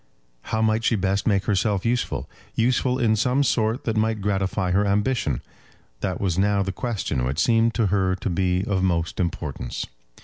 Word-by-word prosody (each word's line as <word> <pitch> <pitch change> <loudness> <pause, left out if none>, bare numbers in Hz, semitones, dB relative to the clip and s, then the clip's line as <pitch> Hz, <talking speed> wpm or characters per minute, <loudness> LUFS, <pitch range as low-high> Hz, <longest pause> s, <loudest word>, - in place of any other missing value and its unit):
How 110 0 0
might 110 +1 +2
she 115 - +2
best 95 0 0
make 100 -3 +2
herself 100 -1 +1
useful, 120 +1 -1 0.3
useful 125 +2 +2
in 115 -3 +2
some 125 +5 +2
sort 115 -2 +1
that 115 - -1
might 110 0 +1
gratify 95 -1 0
her 100 +3 +3
ambition; 105 +5 0 0.6
that 95 -2 -2
was 95 -2 0
now 100 0 +2
the 95 - -2
question 95 - -2
which 65 +3 -2
seemed 115 +3 +3
to 115 - +2
her 95 -2 +2
to 95 - -4
be 90 +1 +1
of 95 -2 0
most 85 -3 0
importance. 85 -5 -3
100 Hz, 175 wpm, -24 LUFS, 95-115 Hz, 0.6 s, her